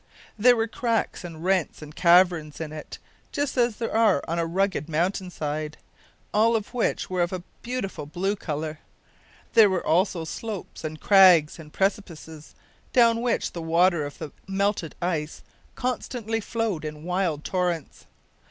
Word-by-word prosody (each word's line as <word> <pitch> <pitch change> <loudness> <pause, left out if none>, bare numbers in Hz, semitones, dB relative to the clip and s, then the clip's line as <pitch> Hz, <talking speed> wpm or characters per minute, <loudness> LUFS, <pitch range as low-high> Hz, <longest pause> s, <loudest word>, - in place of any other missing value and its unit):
There 245 +3 +5
were 225 -1 0
cracks 230 -3 -1
and 165 -2 -8
rents 185 -4 +1
and 150 +1 -11
caverns 170 -4 +4
in 160 -2 -5
it, 155 - -8 0.3
just 285 -1 -2
as 240 -3 +2
there 230 0 -3
are 215 -9 +4
on 170 +1 -1
a 165 - 0
rugged 180 -3 -1
mountain 180 +4 -1
side, 155 -2 -4 0.6
all 225 +2 +4
of 215 +1 -3
which 245 - 0
were 185 -1 -1
of 175 - 0
a 185 -2 -4 0.2
beautiful 235 - -4
blue 190 +6 -1
colour. 155 -4 -4 0.7
There 220 -3 +7
were 185 -2 -1
also 175 +1 +2
slopes 210 +3 -6
and 155 0 -5
crags 180 -6 +6
and 150 -2 -11
precipices, 165 -6 -3 0.4
down 230 -2 +4
which 245 0 0
the 170 - -6
water 170 0 +3
of 145 0 -7
the 150 - -7 0.2
melted 195 -3 -1
ice 160 -3 -2 0.3
constantly 245 -3 -2
flowed 225 -6 -2
in 150 0 -6
wild 180 -4 -1
torrents. 175 -5 -2
180 Hz, 155 wpm, -25 LUFS, 160-215 Hz, 0.7 s, There